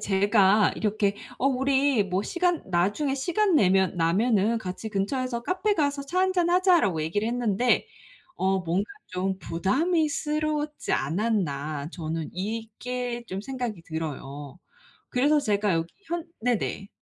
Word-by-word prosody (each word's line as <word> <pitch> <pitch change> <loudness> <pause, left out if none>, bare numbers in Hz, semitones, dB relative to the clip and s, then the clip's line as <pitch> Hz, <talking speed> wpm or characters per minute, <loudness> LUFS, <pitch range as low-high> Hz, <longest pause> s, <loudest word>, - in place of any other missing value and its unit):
제가 200 +1 +4
이렇게 205 -1 0 0.2
어 265 - +1
"우리 270 -2 +2
뭐 190 0 -1
시간 350 - 0
나중에 200 - +1
시간 360 +8 +1
내면 190 - +3
나면은 205 +6 +2
같이 190 +2 -5
근처에서 235 +4 -2
카페가서 315 - 0
차 330 +7 -3
한잔 370 -2 +2
하자."라고 350 - +3
얘기를 205 +8 -1
했는데 240 - +1 0.5
어 190 - +1
뭔가 180 +4 -1 0.2
좀 185 +1 -2
'부담이 300 - +1
스러웠지 300 0 -2
않았나?' 155 -4 -1
저는 160 -2 -4
이게 235 +4 -4
좀 190 +1 -4
생각이 245 -6 -4
들어요. 145 -2 -6 0.5
그래서 290 +4 +3
제가 205 -6 +1
여기 165 +1 -2
현 335 0 -3 0.2
네네. 225 -4 -1
220 Hz, 280 characters per minute, -26 LUFS, 185-280 Hz, 0.5 s, 제가